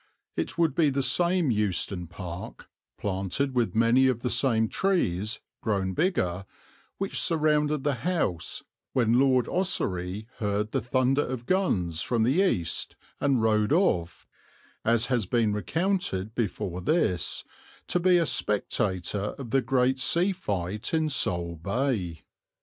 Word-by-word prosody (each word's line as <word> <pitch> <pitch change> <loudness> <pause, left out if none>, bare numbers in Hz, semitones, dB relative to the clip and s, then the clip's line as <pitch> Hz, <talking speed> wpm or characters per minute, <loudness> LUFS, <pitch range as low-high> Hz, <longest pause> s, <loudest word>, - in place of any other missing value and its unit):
It 80 - -3
would 165 -4 +2
be 155 0 +3
the 140 0 0
same 170 +3 +2
Euston 100 -4 -1
Park, 90 +1 -8 0.3
planted 100 +8 -2
with 120 -3 0
many 115 +4 +4
of 125 -3 0
the 125 - -1
same 110 -5 +2
trees, 110 - 0 0.2
grown 95 -4 -1
bigger, 100 - 0 0.5
which 195 0 -1
surrounded 150 -3 +2
the 145 - +1
house, 150 - -1 0.3
when 120 -1 +3
Lord 130 -3 +3
Ossory 100 - -1
heard 105 0 -1
the 135 - 0
thunder 130 +3 +2
of 125 -2 -5
guns 90 - 0
from 115 -3 +1
the 135 +11 +3
east 90 - 0 0.2
and 135 -5 +2
rode 105 0 +2
off, 90 - +1 0.6
as 115 +1 +3
has 120 -7 0
been 115 -1 +1
recounted 110 - -1
before 95 -6 -3
this, 95 - 0 0.4
to 180 - 0
be 180 0 +4
a 170 - +2
spectator 100 - -1
of 125 -5 -8
the 135 - +3
great 130 0 +1
sea 170 +9 +3
fight 105 - -3
in 160 -1 +1
Sole 85 - 0
Bay. 100 - -2
120 Hz, 140 wpm, -27 LUFS, 95-145 Hz, 0.6 s, many